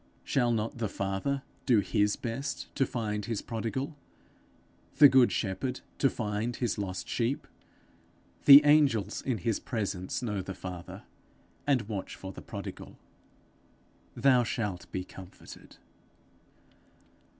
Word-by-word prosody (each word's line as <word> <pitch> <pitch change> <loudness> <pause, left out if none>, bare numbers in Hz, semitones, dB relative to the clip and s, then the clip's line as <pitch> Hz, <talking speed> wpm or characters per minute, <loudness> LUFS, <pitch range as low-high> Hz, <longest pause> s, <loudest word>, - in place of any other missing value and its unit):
Shall 120 -3 +1
not 115 +1 -2
the 110 -3 -1
Father 100 +9 -2 0.2
do 120 -5 +5
his 105 +1 +1
best 130 +4 -5
to 135 - +2
find 105 -5 -3
his 115 -2 -3
prodigal? 120 +6 -3 1.0
the 145 0 +10
good 130 -2 +5
shepherd 100 +5 -2 0.2
to 135 - +4
find 110 +1 -2
his 120 -4 -1
lost 95 -2 -4
sheep? 120 +4 -1 1.0
The 145 +1 +11
angels 145 -8 +3
in 130 -4 -1
his 105 +3 -1
presence 105 -5 -3
know 105 -5 -2
the 95 0 -7
Father, 90 -2 -8 0.6
and 135 -5 +3
watch 100 -3 -5
for 95 - -8
the - - -10
prodigal. - - -8 1.2
Thou 130 -3 +4
shalt 105 -5 -3
be 90 - -3
comforted. 95 0 -13
115 Hz, 125 wpm, -29 LUFS, 100-130 Hz, 1.2 s, The